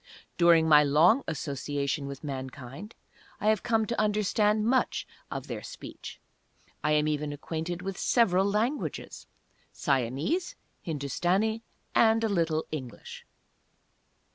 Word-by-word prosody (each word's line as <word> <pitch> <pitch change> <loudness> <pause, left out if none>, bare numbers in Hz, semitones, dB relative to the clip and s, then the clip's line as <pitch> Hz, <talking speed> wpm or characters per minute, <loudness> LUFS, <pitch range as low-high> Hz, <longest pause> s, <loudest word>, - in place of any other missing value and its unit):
During 170 -2 +5
my 150 -1 +7
long 165 - +4
association 140 -1 -2
with 140 +1 -8
mankind 135 - -7 0.4
I 210 - +2
have 215 -2 +2
come 225 -2 +1
to 235 0 -1
understand 210 0 +2
much 255 +3 +1 0.2
of - - -5
their - - -5
speech. - - -9 0.6
I 150 - +2
am 150 0 +3
even 150 -1 -1
acquainted 165 +4 -4
with 195 0 -5
several 195 -6 +3
languages; 225 +8 -2 0.4
Siamese, 140 - -1 0.3
Hindustani, 180 - 0 0.3
and 225 0 +4
a 225 - +1
little 165 -5 0
English. 130 -7 -7
170 Hz, 115 wpm, -28 LUFS, 145-215 Hz, 0.6 s, my